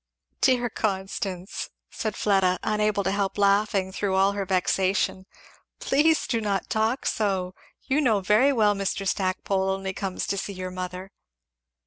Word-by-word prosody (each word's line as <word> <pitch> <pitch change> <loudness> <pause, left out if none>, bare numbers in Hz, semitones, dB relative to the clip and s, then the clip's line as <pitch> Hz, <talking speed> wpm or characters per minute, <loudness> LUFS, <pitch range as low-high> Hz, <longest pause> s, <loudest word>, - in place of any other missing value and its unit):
"Dear 250 -2 +3
Constance!" 190 -2 -3 0.2
said 215 -2 -3
Fleda, 190 -3 +2
unable 210 -1 +1
to 190 - 0
help 200 0 -1
laughing 200 -1 +2
through 195 0 -1
all 195 +1 +4
her 200 -1 -3
vexation, 190 0 0 0.5
"please 315 +3 +2
do 230 -2 -1
not 200 -3 -2
talk 220 +4 0
so! 190 -4 0 0.3
You 280 +3 +1
know 225 -7 +3
very 210 +8 +4
well 215 -5 +3
Mr. 195 0 -2
Stackpole 190 0 0
only 190 0 -2
comes 190 -1 -3
to 200 - -1
see 200 - -5
your 185 -1 -5
mother." 185 +1 -6
195 Hz, 145 wpm, -25 LUFS, 190-215 Hz, 0.5 s, all